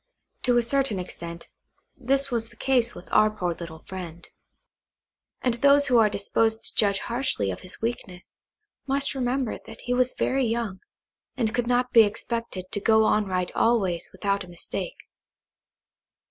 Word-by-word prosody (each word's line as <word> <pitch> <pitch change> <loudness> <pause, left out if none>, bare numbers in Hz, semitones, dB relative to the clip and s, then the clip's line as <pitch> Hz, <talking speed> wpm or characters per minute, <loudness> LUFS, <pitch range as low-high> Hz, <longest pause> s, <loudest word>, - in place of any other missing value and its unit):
To 245 -2 +2
a 240 - +4
certain 270 -3 +2
extent, 170 -2 -7 0.5
this 275 +2 +1
was 230 -1 -1
the - - -19
case 245 -3 +1
with 175 - -11
our 215 - +5
poor 180 -5 -2
little 165 -1 -9
friend; 175 -3 -8 1.2
and 250 - +2
those 280 +4 +4
who 245 -2 +5
are 215 -2 +5
disposed 220 +2 0
to - - -2
judge 200 -2 +2
harshly 235 - -1
of 90 - -6
his 185 - -7
weakness, 200 -6 -5 0.5
must 280 +1 0
remember 255 -2 -1
that 225 - -11
he 245 - -2
was 255 0 +1
very 270 0 +1
young, 225 -4 -2 0.6
and 225 -3 0
could 245 -1 0
not 250 0 +1
be 230 - +8
expected 220 -2 -2
to - - -1
go 220 +1 +4
on 215 -1 +2
right 185 -1 -1
always 195 -7 +1
without 200 +1 -1
a - - -12
mistake. 175 - -5
225 Hz, 160 wpm, -25 LUFS, 190-245 Hz, 1.2 s, be